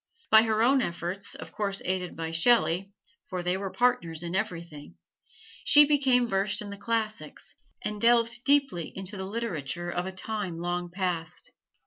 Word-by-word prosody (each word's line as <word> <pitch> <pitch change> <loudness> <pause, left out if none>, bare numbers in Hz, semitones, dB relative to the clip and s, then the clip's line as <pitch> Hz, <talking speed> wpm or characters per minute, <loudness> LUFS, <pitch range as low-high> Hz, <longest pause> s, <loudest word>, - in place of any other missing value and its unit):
By 220 - +9
her 220 0 +1
own 265 +2 +4
efforts, 175 +1 -4
of 160 0 -9
course 200 0 -2
aided 185 -1 -2
by 165 0 -4
Shelley 195 0 +3 0.4
(for 180 -2 -3
they 180 +1 0
were 195 0 -3
partners 175 -9 0
in 170 0 -4
everything), 170 -6 -4 0.7
she 295 0 +8
became 270 -4 +3
versed 195 -1 0
in 205 -1 -5
the - - -6
classics 220 +1 -3 0.3
and 210 -1 -4
delved 235 0 +3
deeply 275 - +2
into 190 +2 -6
the 190 -1 -5
literature 175 - -4
of 175 +1 -2
a - - -4
time 190 -2 -4
long 175 +1 -3
past. 175 -3 -4
195 Hz, 160 wpm, -28 LUFS, 175-230 Hz, 0.7 s, By